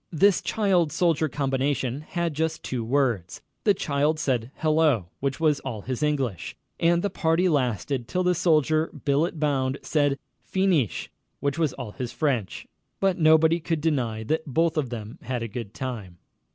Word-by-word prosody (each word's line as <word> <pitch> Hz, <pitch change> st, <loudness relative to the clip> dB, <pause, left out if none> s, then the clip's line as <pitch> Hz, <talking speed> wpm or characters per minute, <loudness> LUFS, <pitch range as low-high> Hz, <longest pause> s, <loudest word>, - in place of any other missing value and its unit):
This 185 Hz, +3 st, +4 dB
child 185 Hz, -7 st, +1 dB
soldier 160 Hz, -2 st, +2 dB
combination 135 Hz, -1 st, -1 dB
had 170 Hz, +1 st, -2 dB
just 160 Hz, +2 st, -2 dB
two 125 Hz, -3 st, -3 dB
words. 120 Hz, -7 st, 0 dB, 0.3 s
The 205 Hz, -2 st, +5 dB
child 150 Hz, 0 st, +1 dB
said 125 Hz, -7 st, 0 dB
"Hello," 155 Hz, -, +2 dB
which 140 Hz, +1 st, -2 dB
was 155 Hz, -3 st, +3 dB
all 115 Hz, -6 st, -5 dB
his 130 Hz, +4 st, -4 dB
English, 135 Hz, -, -1 dB, 0.2 s
and 170 Hz, +1 st, +3 dB
the 205 Hz, -, 0 dB
party 165 Hz, +2 st, +2 dB
lasted 125 Hz, -, 0 dB
till 185 Hz, +7 st, 0 dB
the 180 Hz, 0 st, +3 dB
soldier, 160 Hz, -2 st, +2 dB, 0.2 s
billet 150 Hz, +4 st, +1 dB
bound, 135 Hz, -3 st, 0 dB
said 145 Hz, -3 st, +1 dB, 0.2 s
"Fee 190 Hz, 0 st, -1 dB
neesh," 155 Hz, -, +1 dB, 0.3 s
which 140 Hz, +3 st, -1 dB
was 155 Hz, -5 st, +1 dB
all 125 Hz, -5 st, -7 dB
his 125 Hz, +1 st, -5 dB
French. 130 Hz, -11 st, -1 dB, 0.3 s
But 195 Hz, -2 st, +1 dB
nobody 160 Hz, +1 st, +5 dB
could 165 Hz, 0 st, -1 dB
deny 125 Hz, -8 st, -1 dB
that 155 Hz, +7 st, -1 dB
both 165 Hz, +4 st, +1 dB
of 150 Hz, -6 st, 0 dB
them 110 Hz, -2 st, -7 dB
had 125 Hz, -1 st, -3 dB
a -, -, -3 dB
good 115 Hz, -1 st, -6 dB
time. 110 Hz, -10 st, -5 dB
145 Hz, 165 wpm, -25 LUFS, 125-160 Hz, 0.3 s, The